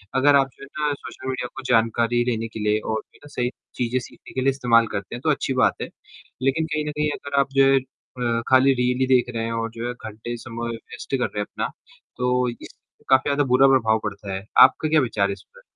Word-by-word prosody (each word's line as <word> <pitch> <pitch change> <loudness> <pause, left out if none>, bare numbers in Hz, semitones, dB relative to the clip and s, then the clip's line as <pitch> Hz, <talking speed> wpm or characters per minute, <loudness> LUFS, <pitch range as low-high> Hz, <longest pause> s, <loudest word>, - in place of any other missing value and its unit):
अगर 140 +2 +5
आप 135 -1 +4
जो - - -14
है - - -9
ना 150 -1 +1
सोशल 130 -2 -9
मीडिया 125 -1 -2
को 135 - -7
जानकारी 115 0 +2
लेने 115 -2 -1
के 110 - -9
लिए 105 0 +1
और 110 0 -2
जो - - -39
है - - -17
ना - - -11
सही 125 0 0 0.3
चीज़ें 125 +1 0
सीखने 125 - -13
के 130 - -1
लिए 135 - +3
इस्तेमाल 120 -4 +3
करते 100 +3 -4
हैं, 120 - -8
तो 155 - 0
अच्छी 140 -2 -1
बात - - +4
है। - - -4 0.5
लेकिन 135 +5 +1
कहीं 155 -1 -2
न 150 - -2
कहीं 150 0 0
अगर 140 0 -1
आप 140 0 +1
जो 135 0 +5
है 135 - +5
अ, 125 -2 -4
खाली 130 +1 +6
रील 125 +1 +1
देख 125 -2 +3
रहे 115 - -1
हैं 115 - -3
और 115 0 -2
जो 115 +1 -5
है 125 - -3
घंटे 110 0 -7
समय 115 0 -5
वेस्ट 120 +3 -6
कर 125 - 0
रहे 105 - -5
हैं 105 - -1
अपना, - - -4 0.5
तो 125 0 +1
इससे 120 - -13
काफ़ी 130 +2 +4
ज़्यादा 145 0 +2
बुरा 135 +2 +6
प्रभाव 115 -5 +3
पड़ता 100 -1 -5
है, 95 +1 -5
आपका 135 +4 +6
क्या 155 -1 +4
विचार 110 -5 0
है - - -1
इस - - -12
पे? - - -17
125 Hz, 250 wpm, -23 LUFS, 115-135 Hz, 0.5 s, खाली